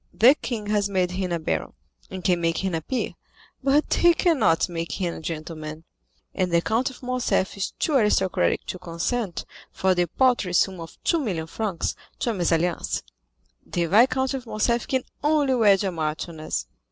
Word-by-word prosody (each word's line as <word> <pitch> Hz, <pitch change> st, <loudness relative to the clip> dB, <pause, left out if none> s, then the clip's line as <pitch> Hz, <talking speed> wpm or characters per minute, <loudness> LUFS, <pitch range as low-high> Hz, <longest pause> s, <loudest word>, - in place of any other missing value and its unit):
"The 245 Hz, +5 st, +7 dB
king 235 Hz, -7 st, -5 dB
has 205 Hz, -1 st, +1 dB
made 185 Hz, -2 st, +1 dB
him 185 Hz, 0 st, -2 dB
a 170 Hz, -, +1 dB
baron, 80 Hz, -, -2 dB, 0.4 s
and 185 Hz, -1 st, -7 dB
can 180 Hz, -2 st, +2 dB
make 165 Hz, -1 st, +1 dB
him 190 Hz, -2 st, -1 dB
a 165 Hz, -, -1 dB
peer, 255 Hz, -, -2 dB, 0.5 s
but 280 Hz, +3 st, +3 dB
he 345 Hz, -1 st, +5 dB
cannot 300 Hz, -, +3 dB
make 165 Hz, -3 st, -4 dB
him 175 Hz, -4 st, -2 dB
a -, -, -7 dB
gentleman, 155 Hz, -1 st, -6 dB, 0.5 s
and 185 Hz, -2 st, 0 dB
the 170 Hz, -, +4 dB
Count 225 Hz, +9 st, 0 dB
of 260 Hz, -, -14 dB
Morcerf 250 Hz, -6 st, 0 dB
is 200 Hz, 0 st, -2 dB
too 310 Hz, -, 0 dB
aristocratic 195 Hz, -, +2 dB
to 185 Hz, -, -5 dB
consent, 180 Hz, +4 st, -3 dB, 0.3 s
for 190 Hz, 0 st, +2 dB
the 175 Hz, -1 st, +1 dB
paltry 240 Hz, -3 st, +2 dB
sum 185 Hz, +1 st, +2 dB
of 165 Hz, 0 st, -9 dB
two 335 Hz, -, +2 dB
million 185 Hz, -, -2 dB
francs, 190 Hz, +1 st, -2 dB, 0.2 s
to 235 Hz, -, 0 dB
a -, -, -2 dB
mésalliance. 175 Hz, -2 st, 0 dB, 0.6 s
The 170 Hz, -, -1 dB
Viscount 255 Hz, -, +3 dB
of 255 Hz, -3 st, -5 dB
Morcerf 235 Hz, +2 st, 0 dB
can 260 Hz, -2 st, 0 dB, 0.2 s
only 295 Hz, -3 st, +3 dB
wed 205 Hz, -5 st, +4 dB
a 195 Hz, -, 0 dB
marchioness." 155 Hz, -, -3 dB
190 Hz, 175 wpm, -24 LUFS, 170-245 Hz, 0.6 s, The